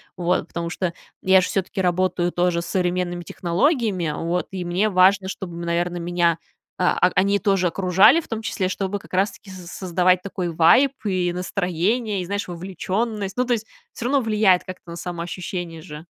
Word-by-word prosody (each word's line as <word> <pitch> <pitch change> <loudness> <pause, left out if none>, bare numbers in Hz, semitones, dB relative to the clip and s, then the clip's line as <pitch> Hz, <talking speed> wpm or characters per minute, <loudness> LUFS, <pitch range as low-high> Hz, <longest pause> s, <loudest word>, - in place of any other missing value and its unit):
Вот, 180 -1 0
потому 170 0 -4
что 175 -1 -2 0.3
я 190 0 +5
ж 180 - 0
всё-таки 190 0 -2
работаю 180 -1 +1
тоже 175 -1 +1
с - - -7
современными 180 -1 -1
технологиями, 185 - 0
вот, 170 +2 -2
и 185 -1 -4
мне 180 +5 +1
важно, 190 0 +4
чтобы, 185 -3 -6
наверно, 170 +1 -1
меня, 170 -1 +1 0.4
а 180 - +3 0.2
а - - -3
они 200 +1 +3
тоже 195 -1 +2
окружали, 190 - +5
в - - -9
том 225 -1 -4
числе, 195 -4 -2
чтобы 195 +2 -3
как - - -18
раз 195 +3 +2
таки 200 - -16
соз 180 -2 -10
создавать 180 0 +1
такой 185 -3 -4
вайб 170 - +5
и 185 -3 0
настроение, 190 +4 -1
и, - - -5
знаешь, 200 +2 -3
вовлеченность. 195 +4 -3
Ну, 250 - +2
то 245 - +1
есть, 220 -2 -2 0.3
всё 235 - -6
равно 275 +3 +3
влияет 210 -5 +3
как-то 185 -2 -10
на 170 - -6
самоощущение 175 -1 -5
же. 150 +1 -10
185 Hz, 180 wpm, -22 LUFS, 175-200 Hz, 0.4 s, я